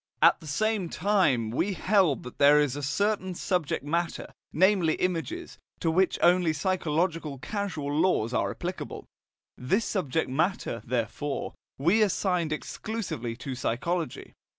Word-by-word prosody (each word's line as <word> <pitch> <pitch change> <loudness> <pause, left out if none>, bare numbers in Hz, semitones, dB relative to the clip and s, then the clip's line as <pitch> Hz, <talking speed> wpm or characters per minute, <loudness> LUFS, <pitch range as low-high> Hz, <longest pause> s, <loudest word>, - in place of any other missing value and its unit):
At - - +6
the 155 - -12
same 205 +3 0
time 155 - +2
we 185 - 0
held 185 -7 +2
that 125 - -10
there 145 +1 +7
is 145 -3 +1
a 145 - -4
certain 190 +5 0
subject 170 -5 -1
matter, 170 +3 -2 0.2
namely 185 -2 +3
images, 185 - -3 0.2
to 165 - +1
which 185 +2 +2
only 175 -2 +4
psychological 165 -2 -1
causal 160 - -3
laws 150 -8 +2
are - - +1
applicable; - - -5 0.5
this 195 - 0
subject 160 -5 -1
matter, 145 - -1
therefore, 125 +4 -2 0.2
we 175 +11 +3
assigned 180 -5 +1
exclusively 155 - -4
to 130 +2 -6
psychology. 135 +6 -2
165 Hz, 130 wpm, -27 LUFS, 145-190 Hz, 0.5 s, there